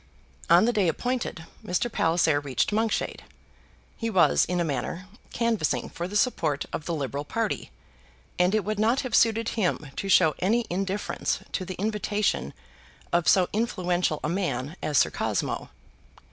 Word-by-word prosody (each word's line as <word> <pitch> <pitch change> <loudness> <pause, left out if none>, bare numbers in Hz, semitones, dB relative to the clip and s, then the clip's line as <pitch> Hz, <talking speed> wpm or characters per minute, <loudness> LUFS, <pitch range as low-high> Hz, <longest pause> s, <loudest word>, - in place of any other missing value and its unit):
On 175 +5 +7
the 240 - +2
day 205 -5 +2
appointed 240 -2 -2 0.2
Mr. 205 +7 -1
Palliser 165 -4 +2
reached 130 - -1
Monkshade. 220 +1 -1 0.7
He 230 - -3
was, 185 -6 +4
in 180 0 -1
a - - +2
manner, 160 - -3 0.2
canvassing 200 - 0
for 175 - -4
the 200 - -8
support 165 - +1
of 150 - -4
the 170 - -2
Liberal 140 -1 -3
party, 225 +8 -2 0.7
and 180 +3 +3
it 215 - 0
would 215 0 -2
not 230 +5 +3
have 255 -4 -6
suited 225 0 +3
him 175 -9 -1
to 195 - -3
show 165 -5 +5
any 225 +6 +2
indifference 195 +2 -2
to 185 - -2
the 185 - -6
invitation 205 - -1 0.6
of 175 -1 +2
so 185 -2 +5
influential 180 -7 0
a - - 0
man 155 -5 -2
as 150 -2 0
Sir - - +4
Cosmo. - - -2
185 Hz, 160 wpm, -26 LUFS, 160-215 Hz, 0.7 s, On